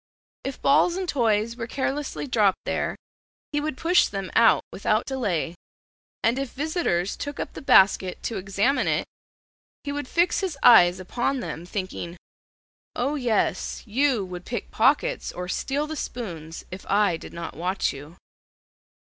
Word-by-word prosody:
If 270 0 -5
balls 320 +5 +4
and 375 -1 -3
toys 230 -5 +1
were 230 -2 -5
carelessly 275 +3 -2
dropped 215 -7 +3
there - - -1 0.6
he 295 - +1
would 305 -3 -3
push 345 +5 +4
them 195 -3 -5
out 230 -1 +5
without 215 +3 +1
delay, 200 - -1 0.7
and 235 +4 +2
if 275 -3 -4
visitors 280 - -1
took 285 0 -6
up - - -4
the - - -8
basket 190 -6 +4
to 230 - -2
examine 200 +8 +1
it, - - +1 0.8
he 285 - -3
would 290 -2 -4
fix 345 +4 +2
his 370 -7 -3
eyes 180 -6 +7
upon 240 +8 -1
them, 175 -7 -6
thinking, 185 -3 -5 0.8
"O 265 +4 0
yes, 245 -7 0
you 245 -1 +1
would 180 -1 -7
pick 240 - -5
pockets - - +2
or 180 0 -5
steal 280 +10 -1
the 315 +1 -5
spoons 170 - -6
if 185 +1 -7
I 200 -3 +3
did - - -9
not 170 0 -7
watch 180 +4 -1
you." 145 +5 -11
230 Hz, 155 wpm, -25 LUFS, 185-280 Hz, 0.8 s, eyes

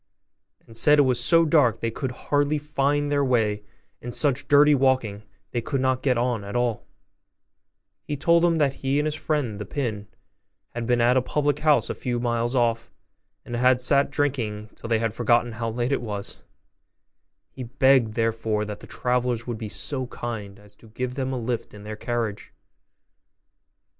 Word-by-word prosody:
and 115 - -15
said 150 +6 +6
it 145 - +6
was 125 -2 +1
so 165 +4 +5
dark 145 -8 +4
that - - -25
they 115 - -1
could 130 +2 -4
hardly 145 +3 0
find 145 0 0
their 145 -1 +2
way, 110 -5 +1 0.4
and 120 0 -5
such 140 -1 0
dirty 145 +1 +6
walking 130 -7 +1 0.3
they 120 - -1
could 135 +3 -2
not 130 0 +1
get 130 -3 +1
on 120 -3 -1
at 100 +2 -7
all: 120 -3 -1 1.1
he 145 - -5
told 170 +4 +3
them 170 -1 +3
that 145 -4 +2
he 135 +1 0
and 150 - +1
his 155 - -1
friend, 145 -9 -2
the - - -3
pin, 105 -3 -4 0.6
had 120 -1 -5
been 120 -1 +2
at 125 +2 +4
a - - +4
public 145 +2 0
house 150 -1 +3
a - - -3
few 120 -2 -3
miles 120 +1 -1
off, 115 -2 +1 0.6
and 120 - -5
had 125 +1 +3
sat 140 +2 +3
drinking 115 -7 -2
till - - -9
they 115 - +3
had 115 -1 -1
forgotten 120 +1 +2
how 115 0 -3
late 120 +3 -2
it 140 - 0
was; 105 -4 -5 1.1
he - - -10
begged 130 -2 +2
therefore 115 -2 0
that 105 -1 -7
the - - -12
travellers 125 -1 -1
would 120 -3 -5
be 110 -2 -5
so 130 +3 -3
kind 105 -5 -6
as 105 0 -17
to 115 - -18
give 125 +3 -4
them 130 -1 -3
a 130 - -2
lift 120 -2 -4
in 105 - -11
their 105 +1 -6
carriage. 115 -2 -3
125 Hz, 190 wpm, -24 LUFS, 115-140 Hz, 1.1 s, said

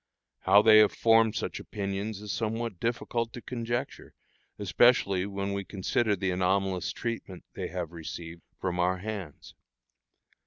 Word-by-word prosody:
How 100 +1 +5
they 110 -1 +8
have 105 -1 +5
formed 115 -1 +4
such - - -3
opinions 100 +1 -4
is 105 -1 -5
somewhat 115 -3 -3
difficult 115 0 -1
to - - -6
conjecture, 120 -1 -4 0.4
especially 100 -2 +3
when 100 0 -3
we 100 0 -2
consider 105 +3 0
the 95 -1 -1
anomalous 95 0 0
treatment 115 -6 -5
they - - -4
have 85 -2 -5
received 85 0 -8 0.2
from 90 -1 -2
our 90 +1 +2
hands. 95 -6 -7
100 Hz, 140 wpm, -29 LUFS, 90-115 Hz, 0.4 s, they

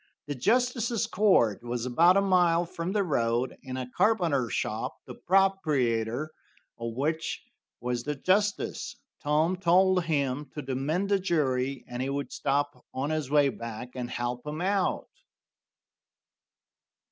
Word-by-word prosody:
The 145 - -3
justice's 235 - +1
court 180 - +3
was 120 0 -3
about 170 +9 +5
a - - +5
mile 175 -3 +3
from 170 +1 -4
the 205 0 +1
road, 120 -6 0
in 130 -2 -6
a 130 -1 -4
carpenter 165 - +2
shop, - - -2
the - - -8
proprietor 155 - +1 0.5
of 115 -1 -4
which 155 +5 -2 0.4
was 120 0 -1
the 150 +4 -3
justice. 205 +7 0 0.3
Tom 155 +4 +1
told 185 0 +3
him 140 -3 -1
to 150 - -4
demand 150 +9 -1
a 200 - +4
jury, 135 -7 0
and 125 0 -5
he 135 - -1
would 140 +1 -3
stop 140 -2 -1
on 135 +4 -1
his 155 -4 -2
way 145 -1 +4
back 115 -1 -7
and 125 -1 -5
help 120 0 -3
him 150 +1 -4
out. 190 +1 0
150 Hz, 140 wpm, -28 LUFS, 125-185 Hz, 0.5 s, about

